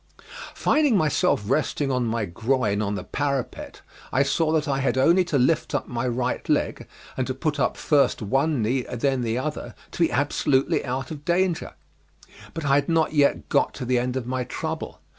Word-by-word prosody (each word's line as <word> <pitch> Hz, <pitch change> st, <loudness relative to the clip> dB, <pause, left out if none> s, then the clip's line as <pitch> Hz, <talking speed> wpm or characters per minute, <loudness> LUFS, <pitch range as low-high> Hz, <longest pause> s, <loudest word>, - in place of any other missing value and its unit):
Finding 295 Hz, -8 st, +3 dB
myself 150 Hz, -, +2 dB
resting 140 Hz, +2 st, 0 dB
on 125 Hz, -2 st, 0 dB
my 115 Hz, -1 st, -1 dB
groin 110 Hz, +2 st, 0 dB
on 100 Hz, -1 st, -1 dB
the 95 Hz, -, -5 dB
parapet, 140 Hz, -3 st, -3 dB, 0.3 s
I 135 Hz, -, +3 dB
saw 155 Hz, +3 st, +1 dB
that 155 Hz, -1 st, +1 dB
I 135 Hz, -1 st, 0 dB
had 135 Hz, -1 st, 0 dB
only 170 Hz, +8 st, +4 dB
to 165 Hz, -5 st, 0 dB
lift 145 Hz, +3 st, +1 dB
up 145 Hz, -, -2 dB
my 120 Hz, +1 st, -2 dB
right 125 Hz, +1 st, -2 dB
leg -, -, 0 dB, 0.3 s
and 130 Hz, -, -2 dB
to 130 Hz, -, -3 dB
put 150 Hz, +1 st, -2 dB
up 125 Hz, -, 0 dB
first 145 Hz, -2 st, +2 dB
one 135 Hz, +4 st, 0 dB
knee 125 Hz, +4 st, 0 dB
and 125 Hz, -1 st, -7 dB
then 135 Hz, 0 st, +1 dB
the 115 Hz, 0 st, -1 dB
other 150 Hz, +4 st, -4 dB, 0.2 s
to -, -, -9 dB
be 165 Hz, -, +3 dB
absolutely 135 Hz, +1 st, +1 dB
out 130 Hz, +1 st, -4 dB
of 150 Hz, -2 st, -7 dB
danger; 175 Hz, 0 st, 0 dB, 0.8 s
but 165 Hz, -, -4 dB
I 140 Hz, -, +3 dB
had 145 Hz, +4 st, +2 dB
not 160 Hz, -1 st, +2 dB
yet 145 Hz, -2 st, +2 dB
got -, -, +1 dB
to 130 Hz, -, -5 dB
the 125 Hz, 0 st, +2 dB
end 125 Hz, +1 st, -2 dB
of 125 Hz, -, -3 dB
my 130 Hz, 0 st, -2 dB
trouble. 160 Hz, +5 st, -5 dB
135 Hz, 200 wpm, -24 LUFS, 125-155 Hz, 0.8 s, only